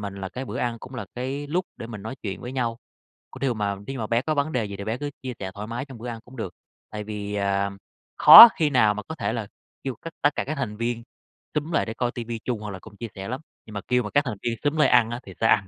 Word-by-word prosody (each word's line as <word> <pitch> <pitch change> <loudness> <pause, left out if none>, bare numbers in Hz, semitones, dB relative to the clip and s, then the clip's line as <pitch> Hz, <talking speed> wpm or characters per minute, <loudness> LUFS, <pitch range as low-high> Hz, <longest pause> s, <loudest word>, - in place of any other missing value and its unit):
mình 100 -1 -5
là 95 -1 -5
cái 125 +8 -6
bữa - - -5
ăn 120 -1 -1
cũng 130 +3 -11
là 100 -6 -5
cái 135 +4 -3
lúc 180 +5 -1
để 115 - -7
mình 105 -4 -8
nói 110 +5 -6
chuyện 100 -3 -4
với 125 - -6
nhau, 120 -3 -1 0.5
có - - -10
điều 130 -2 0
mà 100 -2 -1
thí 135 - -4
dụ 130 - -5
mà 110 - -2
bé 115 +2 +1
có 155 - 0
vấn 145 +2 0
đề 125 -4 0
gì 100 -1 -6
thì 100 - -6
bé 110 +3 -1
cứ 145 0 -3
chia 130 -1 -4
sẻ 95 -1 -4
thoải 105 +1 -6
mái 120 +3 -4
trong 135 -5 -11
bữa 120 - -7
ăn 115 -1 -5
cũng 130 +2 -14
được. 95 -6 -5 0.4
Tại 105 -1 -5
vì, 105 -1 -5
à, 100 0 0 0.5
khó 235 - +13
khi 155 -4 +2
nào 110 -6 +4
mà 105 - -5
có 160 - -7
thể 160 - -2
là 115 -3 -3 0.4
kêu 135 -2 -2
cất 165 - -8
tất 145 - +5
cả - - 0
các 155 - -3
thành 115 -6 -3
viên 115 +1 -2 0.5
xúm 150 +3 -2
lại 155 - +2
để 110 - -4
coi 120 0 0
TV 120 -1 -6
chung, 120 -4 -2
hoặc 105 - -5
là 95 - -6
cùng 105 +3 -14
chia 115 - -5
sẻ 95 0 -6
lắm, 130 +3 -3 0.3
nhưng 110 - -11
mà 100 - -3
kêu 125 0 +3
mà 105 - -5
các 145 +1 +3
thành 110 -6 -4
viên 120 -1 0
xúm 145 +2 +1
lại 155 - +5
ăn 120 -2 +5
á 120 - -4
thì 95 - -10
sẽ 115 - +3
ăn, 100 -2 +4
115 Hz, 310 wpm, -25 LUFS, 105-130 Hz, 0.5 s, khó